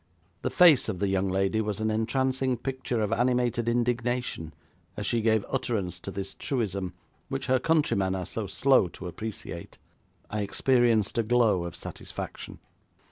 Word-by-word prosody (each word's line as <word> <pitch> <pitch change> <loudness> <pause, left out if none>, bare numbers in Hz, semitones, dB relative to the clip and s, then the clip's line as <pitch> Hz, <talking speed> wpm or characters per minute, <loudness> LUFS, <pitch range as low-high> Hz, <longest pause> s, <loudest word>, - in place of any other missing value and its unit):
The - - -1
face 165 -10 +6
of 100 - -2
the 100 +2 0
young 95 0 +1
lady 95 +3 +1
was 105 -1 -3
an 110 0 0
entrancing 130 +3 0
picture 130 -2 -2
of 105 +1 0
animated 120 -1 +1
indignation 120 -7 -1 0.5
as - - -3
she 115 - +1
gave 110 -1 +2
utterance 105 -9 -2
to 90 - -7
this 95 0 -5
truism 100 -8 -2 0.3
which 135 -1 -3
her 130 0 +3
countrymen 120 - +2
are 90 -1 -3
so 110 +2 -4
slow 130 -2 +3
to 90 - -10
appreciate. 90 -2 -7 0.5
I 105 0 -3
experienced 120 0 +2
a - - +3
glow 110 -6 +3
of 85 0 -6
satisfaction. - - -7
110 Hz, 155 wpm, -28 LUFS, 95-125 Hz, 0.5 s, face